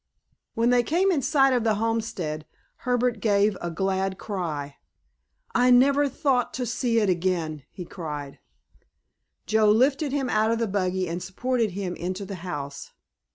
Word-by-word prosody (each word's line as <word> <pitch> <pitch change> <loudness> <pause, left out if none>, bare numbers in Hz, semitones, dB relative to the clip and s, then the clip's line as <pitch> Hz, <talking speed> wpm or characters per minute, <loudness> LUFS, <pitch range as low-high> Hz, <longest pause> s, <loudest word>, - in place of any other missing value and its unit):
When 230 +2 +2
they 245 0 +5
came 350 +10 +2
in 310 -6 +1
sight 270 0 +3
of 245 -3 +1
the 220 -2 +2
homestead 205 -9 -2 0.3
Herbert 245 -2 0
gave 205 -1 +2
a 175 - -3
glad 190 +2 -1
cry. 155 -8 -4 0.8
"I 250 +1 +4
never 275 +3 +5
thought 260 -3 0
to 255 - -2
see 235 -1 0
it 210 - +1
again," 170 -4 -1
he 180 - -8
cried. 150 -6 -7 1.1
Joe 215 0 +3
lifted 270 +6 +3
him 275 -2 -1
out 215 -2 +2
of 230 - +1
the 230 - 0
buggy 185 -2 -1
and 170 +2 -4
supported 225 +3 -1
him 190 -2 -3
into 185 +3 -4
the 195 0 -6
house. 145 -6 -6
210 Hz, 155 wpm, -25 LUFS, 180-245 Hz, 1.1 s, they